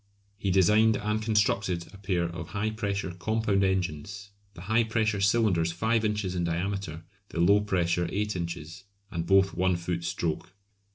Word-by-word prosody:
He 100 - -1
designed 105 +4 +4
and 105 +1 -1
constructed 100 -5 +1
a - - -11
pair 95 -3 0
of 85 0 -5
high 105 +1 -2
pressure 100 -3 -2
compound 100 +2 0
engines, 95 +2 -2 0.2
the 85 - -10
high 110 +5 +2
pressure 110 -2 0
cylinders 100 -6 +2
5 110 +6 +1
inches 105 -3 -1
in 90 -1 -1
diameter, 85 -1 -3 0.3
the - - -5
low 100 +4 +5
pressure 90 -3 0
8 105 0 -1
inches, 85 +1 -6 0.3
and 85 -1 -3
both 95 0 +4
1 95 0 +1
foot 85 0 -3
stroke. 85 +2 -3
95 Hz, 160 wpm, -28 LUFS, 85-105 Hz, 0.3 s, low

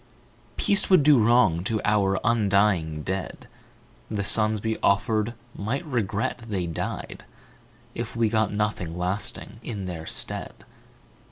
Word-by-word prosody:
Peace 200 - +2
would 185 -6 +6
do 145 -3 +6
wrong 105 -8 +4
to 110 +2 -1
our 100 -2 +2
undying 100 -8 +2
dead, 95 0 -4 0.6
The 100 -1 -2
sons 105 +1 +1
we 110 -1 -1
offered 110 +3 +1 0.2
might 125 - -3
regret 110 -6 -1
they 95 -4 -1
died 85 -2 -5 0.7
If 115 +1 -5
we 115 -1 +2
got 110 0 +1
nothing 105 -5 -2
lasting 95 +3 -3
in 105 -5 -5
their 85 -3 -6
stead. - - -5
105 Hz, 125 wpm, -25 LUFS, 95-115 Hz, 0.7 s, would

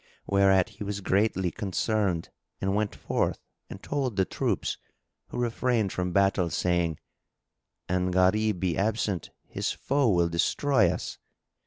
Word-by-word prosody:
Whereat 95 -1 +4
he 105 0 -8
was 100 0 -3
greatly 95 -2 +1
concerned 100 -3 -1 0.3
and 95 0 0
went 105 0 0
forth - - -1 0.3
and - - -9
told 135 -6 -2
the 95 -1 +2
troops, - - -2 0.5
who - - -7
refrained 120 -3 0
from 90 0 -2
battle, 95 -2 +2
saying, 85 -2 0 0.9
"An 90 0 0
Gharib 95 +2 +2
be 90 -2 0
absent, 105 -4 -1 0.2
his - - -2
foe 140 -2 +1
will 85 -4 +3
destroy 130 - +2
us." - - -4
100 Hz, 135 wpm, -27 LUFS, 90-110 Hz, 0.9 s, Whereat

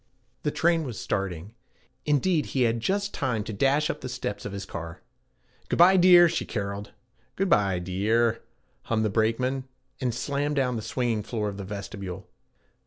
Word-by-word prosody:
The - - 0
train 165 +2 +2
was 125 -7 -6
starting; 95 0 -3 0.5
indeed 150 +2 +2
he 130 - +4
had 115 0 +1
just 200 - -1
time 125 -6 -1
to 110 - -6
dash 140 +8 +2
up 170 - -4
the 130 - -5
steps 125 -5 -4
of 105 - -4
his 100 0 -5
car. 85 -3 -7 0.7
'Good - - 0
bye, 180 +3 +7
dear,' 175 -1 +8
she 170 0 -1
caroled. 100 -1 -4 0.5
'Good 195 0 0
bye, 100 - +3
dee 95 +4 -2
ar,' 115 0 +3 0.5
hummed 110 -1 0
the 105 - 0
brakeman, 125 +5 0 0.3
and 125 -2 0
slammed 145 +5 -2
down 130 -3 +1
the 110 - -3
swinging 120 -1 -1
floor 105 0 -3
of 100 - -7
the 100 - -5
vestibule. 100 -1 -7
115 Hz, 175 wpm, -26 LUFS, 100-145 Hz, 0.7 s, dear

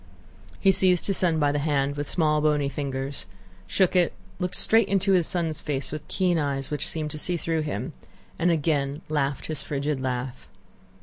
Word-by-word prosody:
He 195 - +5
seized 185 -2 +3
his 195 - +2
son 170 -3 +3
by 145 -2 +2
the 145 - 0
hand 145 -1 0
with 145 0 -4
small 150 -3 +2
bony 150 -2 +2
fingers, 135 -1 -4 0.4
shook 185 - +2
it, 175 -2 +3 0.3
looked 180 -1 -2
straight 225 -2 +5
into 195 0 +2
his 180 -4 +3
son's 165 -4 -2
face 140 -2 -3
with 155 0 -6
keen 180 -3 +1
eyes 140 -2 -2
which 150 - -2
seemed 155 -2 -3
to 155 - -3
see 175 +3 +1
through 165 -1 -1
him, 150 0 -4 0.5
and 170 +2 +3
again 150 -2 0
laughed 140 -3 -1
his 155 -2 -3
frigid 140 -1 -2
laugh. 130 0 -4
150 Hz, 185 wpm, -25 LUFS, 140-175 Hz, 0.5 s, He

